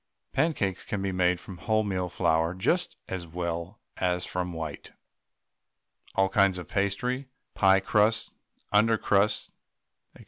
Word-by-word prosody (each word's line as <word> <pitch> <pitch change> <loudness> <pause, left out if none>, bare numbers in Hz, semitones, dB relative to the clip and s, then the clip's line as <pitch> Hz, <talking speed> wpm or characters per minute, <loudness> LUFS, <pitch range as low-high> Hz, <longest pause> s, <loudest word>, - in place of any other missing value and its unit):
Pancakes 105 - 0
can 105 -5 -3
be 95 - 0
made 90 -1 +2
from 90 -1 -10
wholemeal 100 -5 0
flour 85 0 +1
just 175 - 0
as 90 -2 -5
well 85 +2 -4 0.2
as 90 -1 0
from 90 0 -3
white. 80 -3 -6 1.2
All 95 - +4
kinds 100 -1 +3
of 90 - -7
pastry, 125 +7 -1 0.2
pie 95 -1 +5
crusts, 105 +3 +2 0.4
under 110 +2 +4
crusts, 105 +1 +1 0.6
&c. - - -16
95 Hz, 130 wpm, -28 LUFS, 90-105 Hz, 1.2 s, pie